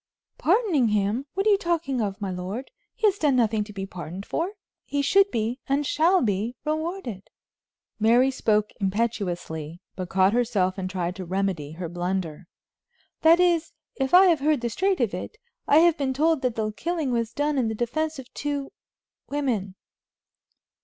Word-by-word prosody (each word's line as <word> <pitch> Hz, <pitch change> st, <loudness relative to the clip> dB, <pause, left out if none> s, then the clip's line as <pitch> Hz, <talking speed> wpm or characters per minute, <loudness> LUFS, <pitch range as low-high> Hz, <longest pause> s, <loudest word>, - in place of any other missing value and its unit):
"Pardoning 350 Hz, -, +3 dB
him! 210 Hz, +5 st, 0 dB
What 390 Hz, +2 st, 0 dB
are 430 Hz, -, +5 dB
you 400 Hz, -, +4 dB
talking 330 Hz, -8 st, -1 dB
of, 200 Hz, -2 st, -3 dB
my 195 Hz, -2 st, -3 dB
lord? 185 Hz, +8 st, -5 dB, 0.2 s
He 445 Hz, -, -1 dB
has 405 Hz, -1 st, +3 dB
done 290 Hz, -4 st, +3 dB
nothing 220 Hz, -3 st, +2 dB
to 210 Hz, -, -11 dB
be 195 Hz, -1 st, -5 dB
pardoned 185 Hz, 0 st, -7 dB
for. 350 Hz, +5 st, -2 dB, 0.3 s
He 285 Hz, 0 st, -2 dB
should 390 Hz, +7 st, +4 dB
be, 230 Hz, -, -2 dB
and 280 Hz, +2 st, +1 dB
shall 335 Hz, +6 st, +3 dB
be, 215 Hz, +3 st, -1 dB
rewarded." 310 Hz, -, -3 dB, 0.7 s
Mary 240 Hz, +5 st, +4 dB
spoke 215 Hz, -4 st, +1 dB
impetuously, 180 Hz, -6 st, -2 dB, 0.2 s
but 185 Hz, -2 st, -5 dB
caught 190 Hz, +1 st, +3 dB
herself 205 Hz, -6 st, +1 dB
and 185 Hz, -1 st, -3 dB
tried 180 Hz, -1 st, -3 dB
to 190 Hz, -, -5 dB
remedy 180 Hz, -5 st, -2 dB
her 175 Hz, +1 st, -5 dB
blunder. 175 Hz, -1 st, -3 dB, 0.7 s
"That 330 Hz, +2 st, +6 dB
is, 340 Hz, -2 st, +2 dB, 0.2 s
if 265 Hz, -1 st, -1 dB
I 375 Hz, +1 st, +9 dB
have 340 Hz, -5 st, +4 dB
heard 295 Hz, -2 st, +1 dB
the 235 Hz, -1 st, -2 dB
straight 380 Hz, -, +1 dB
of 225 Hz, -6 st, +1 dB
it. 185 Hz, -, -6 dB, 0.3 s
I 290 Hz, -, +5 dB
have 335 Hz, -2 st, +4 dB
been 265 Hz, -2 st, -1 dB
told 315 Hz, +1 st, +2 dB
that 250 Hz, -3 st, -1 dB
the 215 Hz, -1 st, -1 dB
killing 320 Hz, +3 st, -2 dB
was 230 Hz, -2 st, -1 dB
done 290 Hz, -1 st, 0 dB
in 240 Hz, -, +1 dB
the 220 Hz, -, -2 dB
defense 310 Hz, +8 st, -2 dB
of 260 Hz, -1 st, -11 dB
two 285 Hz, -1 st, -3 dB, 0.6 s
women." 235 Hz, -10 st, -2 dB
240 Hz, 175 wpm, -25 LUFS, 195-310 Hz, 0.7 s, I